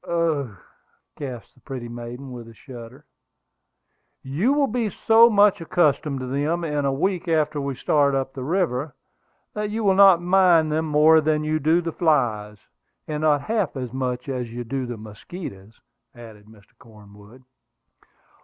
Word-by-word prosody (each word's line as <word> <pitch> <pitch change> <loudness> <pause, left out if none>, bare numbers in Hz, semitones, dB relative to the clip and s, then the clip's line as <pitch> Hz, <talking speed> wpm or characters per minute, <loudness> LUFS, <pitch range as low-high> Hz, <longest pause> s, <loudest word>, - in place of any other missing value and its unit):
"Ugh!" 155 - -1 0.6
gasped 125 -7 -8
the - - -25
pretty 130 -2 -7
maiden, 120 +3 -8
with 120 -2 -9
a 115 - -14
shudder. 125 +3 -12 1.2
"You 155 - 0
will 285 0 +2
be 235 -3 -2
so 225 +4 +5
much 205 -3 +4
accustomed 150 -5 0
to - - -4
them 145 +6 -1
in 150 -3 -2
a 135 - +1
week 175 +6 -1
after 155 -2 0
we 140 -1 -3
start 140 +1 +1
up 135 0 -2
the 130 - -6
river, 150 -4 -1 0.6
that 210 0 -3
you 220 +1 -3
will 195 -2 +4
not 190 -2 +7
mind 175 -3 +3
them 160 +1 0
more 155 +1 +5
than 155 0 0
you 155 +1 -1
do 160 +4 +2
the 165 -1 -4
flies, 120 -11 0 0.5
and 150 -1 -4
not 150 -2 +2
half 210 0 -1
so 130 -2 -4
much 125 -1 -3
as 125 -4 -4
you 120 +1 -5
do 130 +2 -4
the 120 -1 -6
mosquitoes," 105 - -10 0.4
added 110 -3 -13
Mr. 105 -2 -20
Cornwood. 105 +2 -17
145 Hz, 165 wpm, -23 LUFS, 125-170 Hz, 1.2 s, not